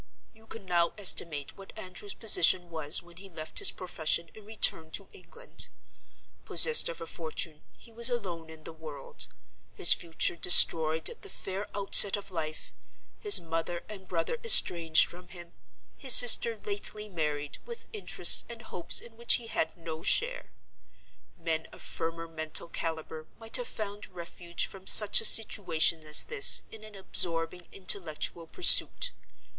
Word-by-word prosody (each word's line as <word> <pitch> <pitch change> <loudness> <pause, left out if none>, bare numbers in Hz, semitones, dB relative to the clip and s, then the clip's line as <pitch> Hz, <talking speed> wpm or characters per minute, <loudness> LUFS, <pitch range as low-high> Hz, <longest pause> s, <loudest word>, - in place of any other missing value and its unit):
"You 220 0 -23
can 225 -3 -12
now 175 -2 -2
estimate 165 -7 -2
what 195 +2 -15
Andrew's 190 0 -9
position 175 -5 +2
was 160 0 -2
when 170 -1 -20
he 195 +1 -13
left 155 -3 -4
his - - +5
profession 170 -2 -4
and 215 -1 -17
returned 160 -7 0
to 195 - -6
England. 475 - -10 0.7
Possessed 470 -1 +3
of 165 - -10
a - - -8
fortune, 160 -1 -7 0.2
he 235 - -20
was 235 +2 +2
alone 180 -9 -7
in 160 -1 -15
the - - -11
world; 155 -4 -9 0.5
his - - +5
future 165 0 -3
destroyed 160 -2 +5
at 470 - -7
the 405 - -13
fair 195 - -8
outset 200 0 +4
of 200 -1 -12
life; 155 -3 -8 0.5
his 415 -1 +3
mother 165 +1 -7
and 195 -3 -13
brother 170 - -5
estranged 170 - +6
from 180 +1 -15
him; 175 -1 -15 0.4
his 265 -3 +4
sister 235 -1 +5
lately 210 +1 -7
married, 150 -6 -7
with 470 0 -11
interests 425 - +3
and 235 -1 -12
hopes 175 -5 -4
in 230 -1 -18
which 235 0 +2
he 240 - -6
had 160 -7 -5
no 160 -1 -10
share. - - -1 0.9
Men 165 -2 -4
of - - -16
firmer 165 0 -6
mental 155 0 -7
caliber 160 -1 -8
might 225 0 -2
have - - -8
found 205 -1 -9
refuge 170 -1 -7
from 190 -1 -14
such 210 -2 +6
a - - +1
situation 170 -8 +2
as 150 0 +3
this 140 - +3
in 220 -1 -14
an 215 -1 -14
absorbing 175 -2 0
intellectual 170 -3 -4
pursuit. 485 - +3
175 Hz, 155 wpm, -26 LUFS, 160-210 Hz, 0.9 s, estranged